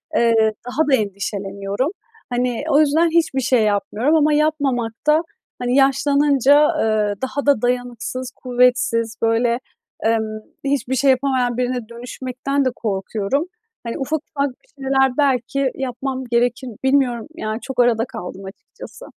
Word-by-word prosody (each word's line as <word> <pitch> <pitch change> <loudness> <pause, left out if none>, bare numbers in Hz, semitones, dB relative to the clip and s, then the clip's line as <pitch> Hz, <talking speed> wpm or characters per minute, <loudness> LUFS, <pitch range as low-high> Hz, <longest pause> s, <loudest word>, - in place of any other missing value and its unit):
Eee, 225 -3 +4 0.2
daha 295 +5 0
da 270 - +6
endişeleniyorum. 200 - -3 0.4
Hani, 245 0 -1
o 295 0 +5
yüzden 315 +3 +3
hiçbir 320 -5 +1
şey 250 -2 +3
yapmıyorum 215 +7 +1
ama 305 -1 +3
yapmamakta 295 -1 +1 0.4
hani 245 0 0
yaşlanınca, 280 +1 +4 0.2
eee, 215 -2 +1
daha 280 +2 -2
da 285 -6 +3
dayanıksız, 245 +1 -2
kuvvetsiz, 245 -2 +1
böyle, 235 +1 +2 0.5
emm, 220 -1 0 0.2
hiçbir 275 -2 0
şey 270 +1 +4
yapamayan 255 -2 0
birine 245 -2 -2
dönüşmekten 255 +3 -3
de - - +3
korkuyorum. 210 - -2 0.4
Hani, 230 - -4
ufak, 295 +3 -1
ufak 280 0 +1
bir 270 +2 -16
şeyler 265 -1 +2
belki 275 -1 +1
yapmam 265 0 -4
gerekir, 245 +2 +1
bilmiyorum, 265 -4 +2
yani, 215 -7 -3
çok 265 -2 -6
arada 235 -1 +2
kaldım 190 -1 -8
açıkçası. 200 - -12
250 Hz, 130 wpm, -20 LUFS, 230-275 Hz, 0.5 s, da